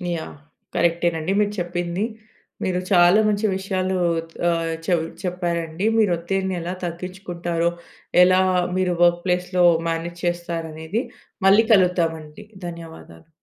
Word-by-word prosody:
Yeah! 160 - -7 0.4
కరెక్టేనండి 170 +1 +1
మీరు 205 0 +1
చెప్పింది. 175 +2 -2 0.6
మీరు 180 -1 0
చాలా 175 +2 +6
మంచి 210 +1 +1
విషయాలు 190 -1 -1 0.5
ఆహ్, 165 -1 0
చె - - -4 0.3
చెప్పారండి. 175 0 -2
మీరు 210 -5 +3
ఒత్తిడిని 190 +2 -2
ఎలా 175 +2 -4
తగ్గిచ్చుకుంటారో, 175 -1 -3 0.5
ఎలా 185 +1 +5 0.4
మీరు 185 -1 +1
వర్క్‌ప్లేస్‌లో 180 +1 +2 0.2
మ్యానేజ్ 170 +1 -4
చేస్తారనేది 170 +3 -3 0.4
మళ్ళీ 210 +4 +6
కలుద్దామండి. 165 -4 +1 0.2
ధన్యవాదాలు. 165 - -11
175 Hz, 105 wpm, -22 LUFS, 170-185 Hz, 0.6 s, చాలా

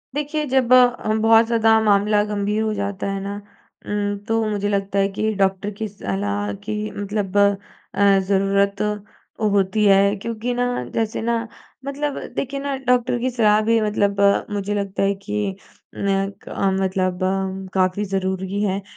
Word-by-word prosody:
देखिए, 300 +1 -2
जब 255 -2 +2
अ, 245 -3 +4
बहुत 225 +1 +5
ज़्यादा 225 -1 +3
मामला 205 0 +3
गंभीर 210 0 -1
हो 215 -1 -1
जाता 200 -1 -3
है 195 - -3
ना 200 +1 -4 0.5
उम्म 205 0 -2
तो 225 -1 +1
मुझे 205 -1 -1
लगता 200 0 -1
है 195 - +3
कि 220 0 0
डॉक्टर 195 +1 +1
की 220 - -2
सलाह 100 - -3
की 215 - -3 0.2
मतलब 205 -1 -3
अ, 200 0 +2
ज़रूरत 200 0 +1 0.6
होती 205 0 +2
है, 200 0 +5
क्योंकि 230 +3 -4
ना 245 0 0 0.2
जैसे 225 -1 -1
ना 230 0 -1 0.4
मतलब 285 +1 -3 0.2
देखिए 275 +1 -3
ना 280 0 -2
डॉक्टर 250 0 +2
की 255 +2 0
सलाह 215 -3 +3
भी 225 +1 +2
मतलब 205 -1 0 0.3
मुझे 205 0 -2
लगता 200 -1 -2
है 195 0 +2
कि 205 -2 -2 0.4
नय 195 0 0
क - - -11 0.3
मतलब 185 -1 -1 0.5
काफ़ी 185 +1 +1
ज़रूरी 190 0 -2
है 200 -1 0
205 Hz, 150 wpm, -21 LUFS, 195-225 Hz, 0.6 s, बहुत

